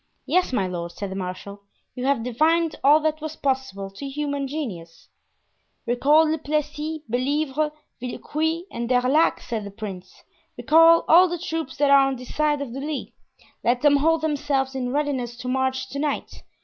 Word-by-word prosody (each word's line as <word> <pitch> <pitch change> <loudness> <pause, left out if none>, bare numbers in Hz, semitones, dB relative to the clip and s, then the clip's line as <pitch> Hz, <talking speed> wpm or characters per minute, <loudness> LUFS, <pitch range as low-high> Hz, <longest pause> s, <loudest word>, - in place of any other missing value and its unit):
"Yes, 365 -4 +1
my 205 -7 +1
lord," 175 -2 -5
said 200 +2 -6
the - - -5
marshal, 195 +2 -6 0.3
"you 250 - -5
have 275 -5 +1
divined 315 +7 +1
all 290 +3 +6
that 310 0 -1
was 315 0 -5
possible 260 -10 -2
to 275 +8 -7
human 285 -1 -3
genius." 200 - -6 0.8
"Recall 295 +6 +4
Le 320 - -1
Plessis, 300 +1 -3
Bellievre, 285 +5 0 0.3
Villequier 315 +6 -2
and 235 0 -4
D'Erlac," 255 +5 +3
said 225 -3 -4
the 200 - -7
prince, 195 -3 -9 0.3
"recall 330 +2 +5
all 355 +3 +7
the 350 - -2
troops 325 -5 -4
that 285 0 +3
are 275 -1 +6
on 270 - -1
this 250 0 -10
side 300 -1 +1
of 240 -4 -8
the 270 - -5
Lys. 295 0 -4 0.5
Let 245 +3 +1
them 290 -1 +6
hold 320 +3 +2
themselves 285 -3 -1
in 250 -2 -3
readiness 265 -4 -2
to 250 - -7
march 260 0 -1
to 280 - -5
night. 295 0 -3
275 Hz, 175 wpm, -24 LUFS, 245-305 Hz, 0.8 s, all